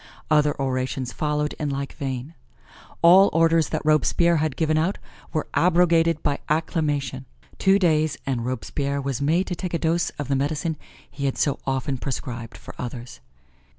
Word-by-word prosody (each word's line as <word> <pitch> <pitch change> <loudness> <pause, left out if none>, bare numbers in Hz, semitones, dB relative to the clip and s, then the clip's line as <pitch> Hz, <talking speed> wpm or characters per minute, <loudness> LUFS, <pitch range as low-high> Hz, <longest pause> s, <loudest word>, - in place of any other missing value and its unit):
Other 150 -1 +3
orations 130 -1 -2
followed 150 0 -1
in 150 - -1
like 140 0 -4
vein. 135 +2 -5 0.7
All 185 +4 +8
orders 165 0 +3
that - - -2
Robespierre 165 +2 +3
had 155 -3 -1
given 155 -2 +1
out 165 +6 +1 0.3
were 155 - -1
abrogated 170 -2 +3
by 140 - 0
acclamation. 145 -4 -1 0.3
Two 195 +1 +4
days 155 -5 +2
and 125 -4 -1
Robespierre 140 +3 -2
was 135 -1 -3
made 165 +6 +2
to - - -4
take 175 0 -4
a - - +3
dose 165 +1 +1
of 145 - -4
the 140 - +1
medicine 155 +4 -1 0.3
he 140 - -5
had 135 - -1
so 140 - 0
often 135 0 -1
prescribed 120 -4 -5
for - - -11
others. 120 - -7
150 Hz, 160 wpm, -24 LUFS, 135-165 Hz, 0.7 s, All